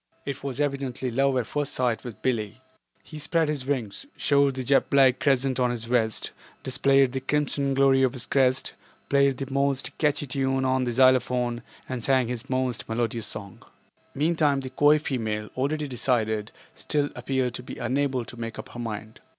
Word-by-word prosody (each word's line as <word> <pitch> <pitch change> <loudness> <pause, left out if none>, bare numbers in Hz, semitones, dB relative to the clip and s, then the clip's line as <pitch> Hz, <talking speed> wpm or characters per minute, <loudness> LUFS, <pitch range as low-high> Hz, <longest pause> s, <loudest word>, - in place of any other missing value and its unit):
It 140 -1 -5
was 140 -1 -4
evidently 135 -3 -2
love 135 +2 +2
at 125 - 0
first 145 +4 -2
sight 125 -3 0
with 120 -4 -9
Billie. 115 -3 -1 0.4
He 155 - -9
spread 160 +1 +1
his 140 -4 -3
wings, 130 - -3
showed 140 -2 +3
the 130 - -3
jet 135 +2 +2
black 135 -2 +5
crescent 135 -2 +1
on 125 -1 +3
his 120 -2 -3
vest, 115 -2 0 0.3
displayed 135 0 +3
the 135 - -2
crimson 140 -1 0
glory 135 -1 +4
of 130 -1 +2
his 125 -4 -2
crest, 130 0 +1 0.4
played 140 -1 +3
his 135 -1 -5
most 140 0 0
catchy 145 -1 +1
tune 135 0 0
on 130 0 +1
the 120 - -1
xylophone 125 -1 +3 0.3
and 130 -3 -4
sang 130 -2 +2
his 125 +1 -5
most 130 -2 -2
melodious 115 0 -1
song. 100 -2 -7 0.5
Meantime 150 -2 +2
the 130 -1 -7
coy 145 +3 +5
female, 110 -8 -3
already 145 +3 -1
decided, 110 -4 -1 0.2
still 145 -2 -1
appeared 125 0 -1
to - - -5
be 125 - -9
unable 130 0 -1
to - - -10
make 115 -1 -5
up - - -8
her 120 - -9
mind. 110 -2 -6
130 Hz, 180 wpm, -26 LUFS, 120-140 Hz, 0.5 s, black